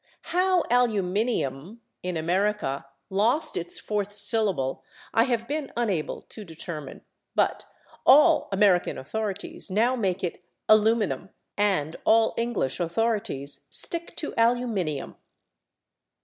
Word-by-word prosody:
How 365 0 +3
/aluminium/, 210 - 0 0.2
in 180 -2 -3
America, 175 -4 0 0.2
lost 225 +10 +1
its 170 0 -3
fourth 205 -1 -2
syllable 205 - +1 0.3
I 225 - +4
have 235 -3 -1
been 295 0 -3
unable 200 -10 -1
to 215 - -9
determine, 160 -4 -7 0.3
but - - +1 0.4
all 300 +4 +6
American 195 -3 +3
authorities 205 +8 -5
now 230 +7 +2
make 190 -6 -1
it 180 0 -3 0.2
/aluminum/ 215 -3 +3 0.3
and 185 -7 +1
all 225 0 +4
English 230 - -1
authorities 170 -6 -2
stick 340 0 -4
to 300 - -4
/aluminium 230 - 0
205 Hz, 105 wpm, -26 LUFS, 175-235 Hz, 0.4 s, all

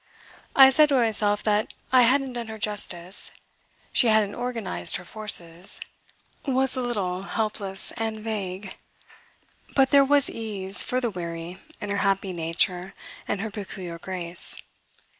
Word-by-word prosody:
I 270 -1 +9
said 300 +2 +5
to 280 - +2
myself 215 -4 +1
that 210 0 0 0.2
I 255 -1 +6
hadn't 270 -1 +1
done 240 -2 -5
her 220 0 -7
justice; 200 -4 +1 0.6
she 245 - +5
hadn't 215 -2 +3
organised 240 -5 -1
her 180 - -5
forces, 180 -4 +2 0.6
was 265 -1 +1
a 255 - -2
little 195 -7 -2
helpless 200 -2 -3
and 225 -1 -2
vague, 200 -3 -5 1.0
but 265 -2 +4
there 280 -1 +7
was 285 0 +3
ease 200 -4 0
for 255 - -1
the 240 -3 -1
weary 170 0 -6 0.2
in 205 - -5
her 200 - -1
happy 195 -1 0
nature 175 +3 -1 0.3
and 195 - -2
her 220 0 -4
peculiar 190 -4 -7
grace. 175 -1 -1
210 Hz, 140 wpm, -25 LUFS, 185-240 Hz, 1.0 s, I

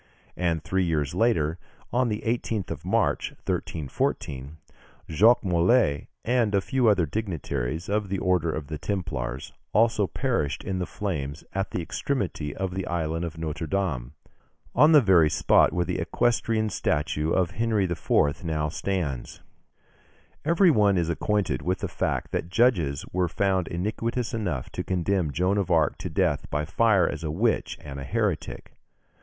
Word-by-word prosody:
And 85 -3 -1
three 95 +3 0
years 75 -5 0
later, 85 -8 +1 0.3
on 125 0 +2
the 105 0 -3
18th 115 -3 -2
March, - - 0
1314, 70 -1 -3 0.5
Jacques 110 +9 +4
Molay, 90 - +2 0.2
and 115 -4 +2
a - - +4
few 120 +5 +1
other 100 -5 +4
dignitaries 80 - -3
of 105 -1 -1
the 95 - -1
Order 90 -3 +1
of 75 -1 -4
the 75 +1 -6
Templars, 70 -10 -4 0.2
also 110 -2 +3
perished 115 - -1
in 95 -1 -2
the 90 - -2
flames 75 -7 -4
at 95 +1 -1
the 90 - -3
extremity 85 - -3
of 95 -1 -3
the 95 -1 -3
island 80 0 -1
of 80 -1 -7
Notre 80 0 -4
Dame, 75 -10 -2 0.6
on 150 +2 +6
the 150 -2 +8
very 90 -8 +5
spot - - +4
where 90 0 0
the 90 +1 -2
equestrian 110 +3 +1
statue 75 -1 0
of 90 -1 +2
Henry 110 -1 +1
IV. 85 -3 +1
now 75 -2 -1
stands. 80 -7 -3 1.0
Every 170 +4 +4
one 105 -7 +3
is 85 -1 0
acquainted 95 - 0
with 90 +1 0
the - - -3
fact - - -2
that 85 - -2
judges 90 - +2
were 90 0 +1
found 95 0 0
iniquitous 115 +7 -2
enough 90 - -3
to - - -4
condemn 90 -3 0
Joan 90 +7 +1
of 95 - -1
Arc 80 -4 +2
to - - -4
death - - 0
by 75 +1 -1
fire 100 +3 +3
as - - -4
a 80 - -2
witch 105 +9 0
and 70 -2 -7
a - - -5
heretic. 95 - -2
90 Hz, 160 wpm, -26 LUFS, 80-105 Hz, 1.0 s, the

